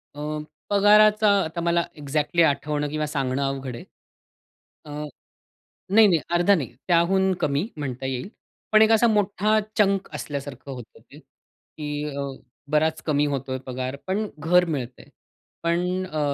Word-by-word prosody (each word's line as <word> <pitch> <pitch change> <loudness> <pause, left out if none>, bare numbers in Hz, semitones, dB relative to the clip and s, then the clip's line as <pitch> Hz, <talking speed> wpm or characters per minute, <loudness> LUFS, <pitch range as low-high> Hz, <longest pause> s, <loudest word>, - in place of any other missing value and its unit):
अ, - - -9 0.5
पगाराचा 210 +1 +5
आता 165 +2 -4
मला 170 0 +2
एक्झॅक्टली 150 +3 0
आठवणं 150 0 0
किंवा 155 0 -2
सांगणं 135 -2 -1
अवघड 135 -2 -3
आहे. 120 - -10 1.0
अ. 150 0 -6 0.9
नाही-नाही, 200 -8 +6
अर्धा 175 +4 +4
नाही. 135 - -4
त्याहून 190 +2 +3
कमी 145 +7 0
म्हणता 130 -3 -5
येईल. 130 +3 -3 0.4
पण 215 0 +6
एक 220 0 +5
असा 225 +1 +5
मोठा 210 0 +2 0.2
चंक 195 -2 +2
असल्यासारखं 140 -2 -6
होतं 125 -4 -10
ते - - -13
की 150 -1 -9
अ, - - -2 0.5
बराच 155 +1 +1
कमी 150 -2 +2
होतोय 135 -2 -2
पगार, 130 +1 -4
पण 205 +3 -1
घर 175 +4 +4
मिळतंय. 130 -7 -5 0.6
पण 180 +2 0
अ, 155 -4 -4
155 Hz, 135 wpm, -24 LUFS, 140-190 Hz, 1.0 s, नाही-नाही